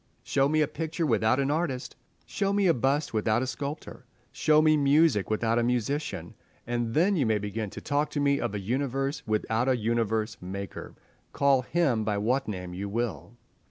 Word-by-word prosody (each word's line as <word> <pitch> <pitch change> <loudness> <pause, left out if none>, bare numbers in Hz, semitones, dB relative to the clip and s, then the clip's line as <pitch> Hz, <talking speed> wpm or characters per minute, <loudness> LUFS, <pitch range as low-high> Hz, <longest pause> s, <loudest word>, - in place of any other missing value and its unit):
Show 135 0 +1
me 155 +1 +2
a 150 - +2
picture 165 +2 -3
without 115 -1 +2
an 140 +1 +1
artist, 150 -5 -2 0.3
show 200 -1 -1
me 200 -1 +2
a 170 - +5
bust 135 +4 0
without 110 +2 +1
a - - -1
sculptor, 140 +3 -6 0.2
show 155 0 +3
me 155 0 +5
music 145 - +3
without 115 +2 +1
a - - +1
musician, 125 - -2 0.3
and 120 -1 -2
then 190 +6 +3
you 140 -9 +1
may 110 -1 +2
begin 105 +1 -4
to - - -9
talk 145 +1 0
to 145 - -3
me 140 -1 +2
of 115 -4 -2
a - - -2
universe 135 +6 -2
without 110 +3 0
a 130 - +3
Universe 110 -1 -1
maker, 95 +2 -7 0.4
call 140 -2 +3
Him 130 -5 +1
by 105 -1 -1
what 125 +7 0
name 90 -4 -5
you 100 +3 -4
will. 120 +2 -4
125 Hz, 190 wpm, -27 LUFS, 110-145 Hz, 0.4 s, a